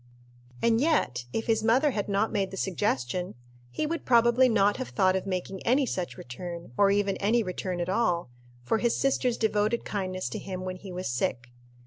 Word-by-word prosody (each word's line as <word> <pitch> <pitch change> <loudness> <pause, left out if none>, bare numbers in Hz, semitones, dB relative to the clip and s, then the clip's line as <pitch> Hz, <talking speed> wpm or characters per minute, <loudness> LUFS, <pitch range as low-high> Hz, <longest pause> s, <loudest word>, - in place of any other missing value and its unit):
And 230 0 +3
yet, 130 - +1
if 225 - -2
his 225 -1 +1
mother 255 +6 +4
had 205 -4 -3
not 200 +2 +1
made 200 -3 0
the 195 - -8
suggestion, 180 - -1 0.3
he 120 - -2
would 330 +2 -3
probably 240 +1 +5
not 205 -2 +3
have 255 - -4
thought 190 -2 +2
of 190 +1 -2
making 185 0 -3
any 265 +4 +3
such 180 -7 -4
return, 170 +5 -7
or 200 +6 +4
even 200 -1 +1
any 225 +4 +2
return 185 -1 -4
at 175 - -1
all, 180 - 0 0.3
for 220 - +1
his 235 0 +1
sister's 255 -3 +1
devoted 215 +1 +1
kindness 185 -2 -3
to 215 - -5
him 185 -2 -6
when 185 0 -4
he 190 0 -10
was 180 +1 -4
sick. 120 -1 -2
200 Hz, 190 wpm, -28 LUFS, 185-230 Hz, 0.3 s, probably